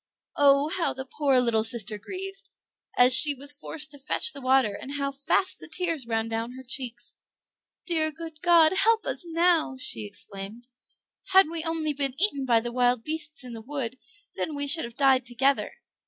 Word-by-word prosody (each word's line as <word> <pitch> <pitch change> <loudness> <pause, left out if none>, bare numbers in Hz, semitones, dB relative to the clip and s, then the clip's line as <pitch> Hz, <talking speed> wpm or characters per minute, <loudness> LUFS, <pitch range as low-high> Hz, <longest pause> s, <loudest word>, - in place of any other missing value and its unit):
Oh, 280 +1 +4
how 335 +1 -1
the 265 0 -7
poor 275 -1 +1
little 230 -3 +1
sister 220 -2 +3
grieved, 390 - -8 0.5
as 250 +1 +6
she 290 +2 +7
was 280 +2 -2
forced 300 +1 -6
to 285 - -10
fetch 305 +6 0
the 280 - -8
water, 260 -4 +2
and 265 +7 -8
how 280 -1 -2
fast 280 +7 +1
the - - -11
tears 330 -9 -1
ran 225 -1 -1
down 225 +2 -4
her 260 +1 -11
cheeks! 250 -1 -3 0.7
"Dear 315 -3 +1
good 320 -1 -10
God, 335 -2 +5
help 450 +3 +2
us - - -3
now!" 335 -4 +1
she 110 - -3
exclaimed. 200 - -9 0.7
"Had 380 -3 +6
we 330 -1 -4
only 325 -2 -2
been 275 -1 -3
eaten 285 -9 +1
by 235 -2 +4
the 240 +1 -5
wild 245 -1 +1
beasts 310 -1 -5
in 250 -1 -9
the 225 - -8
wood 260 -1 -5 0.3
then 310 - -4
we 285 0 -2
should 320 +1 +1
have 235 0 -11
died 270 -1 +3
together." 260 +3 0
275 Hz, 185 wpm, -26 LUFS, 245-315 Hz, 0.7 s, she